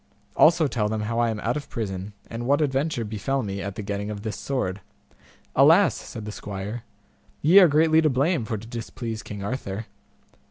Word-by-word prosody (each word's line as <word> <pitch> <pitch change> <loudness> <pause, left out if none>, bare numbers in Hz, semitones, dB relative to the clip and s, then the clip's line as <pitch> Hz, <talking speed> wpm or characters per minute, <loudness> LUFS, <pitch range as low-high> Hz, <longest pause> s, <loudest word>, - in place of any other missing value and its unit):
Also 165 0 +5
tell 115 -6 0
them 110 0 -2
how 115 +2 -2
I 120 -1 +3
am 110 -1 -3
out 120 - 0
of 150 - -5
prison, 100 -2 -4
and 120 +1 -6
what 140 +1 +3
adventure 140 -3 0
befell 110 +6 -2
me 100 -1 -4
at 100 0 -5
the 105 - -5
getting 100 +1 -3
of 105 -1 -6
this 110 -1 -3
sword. 105 -8 -3 0.7
Alas! - - +6
said 110 - -8
the 105 - -5
squire, 105 +3 -6 0.6
ye 170 +7 +8
are 185 - +8
greatly 160 +1 +4
to 155 - +3
blame 140 +2 +1
for 110 0 -3
to 105 - -10
displease 115 -1 -5
King 100 -1 -7
Arthur. 110 -2 -4
115 Hz, 195 wpm, -25 LUFS, 105-135 Hz, 0.7 s, ye